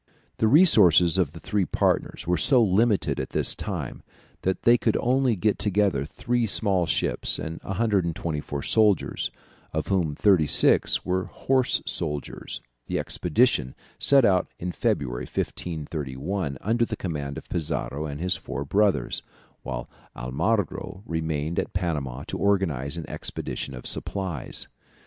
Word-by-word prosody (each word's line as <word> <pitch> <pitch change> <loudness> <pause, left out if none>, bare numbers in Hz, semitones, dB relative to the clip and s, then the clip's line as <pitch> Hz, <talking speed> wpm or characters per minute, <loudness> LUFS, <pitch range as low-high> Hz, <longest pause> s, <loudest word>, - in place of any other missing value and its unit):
] - - -39
The 110 - +3
resources 95 - +6
of 80 -5 +1
the 85 - -9
three 105 +2 0
partners 85 - 0
were 90 +1 +2
so 120 - +5
limited 105 +1 +2
at - - -3
this - - +4
time, - - -5 0.4
that 95 0 -1
they 120 - +6
could 115 -2 +1
only 125 -1 +2
get 105 +2 0
together 100 -9 +1
three 120 +8 -1
small 95 -4 +1
ships - - 0
and 80 +1 -5
124 85 -8 -1
soldiers, 105 -3 +2 0.4
of - - -3
whom 85 -6 +1
thirty 90 -6 +4
six - - +3
were 95 +1 0
horse 130 -2 0
soldiers; 75 -4 -4 0.2
the - - -1
expedition 65 - +1 0.2
set 140 -3 +5
out 95 -2 +3
in 90 +1 -4
February, - - -1
1531, 75 +1 -4
under 115 +4 +1
the - - -2
command 70 -6 -4
of - - -9
Pizarro 80 -2 -3
and 70 0 -6
his 90 +2 +1
four 70 - -5
brothers, 100 +6 +1 0.4
whilst - - -5 0.2
Almagro 95 - -2
remained 80 -1 -2
at - - -3
Panama 75 -8 -2
to - - -5
organize 85 -8 0
an 80 - -6
expedition 70 - -5
of 60 - -10
supplies. 95 -9 -1
90 Hz, 140 wpm, -25 LUFS, 75-105 Hz, 0.4 s, resources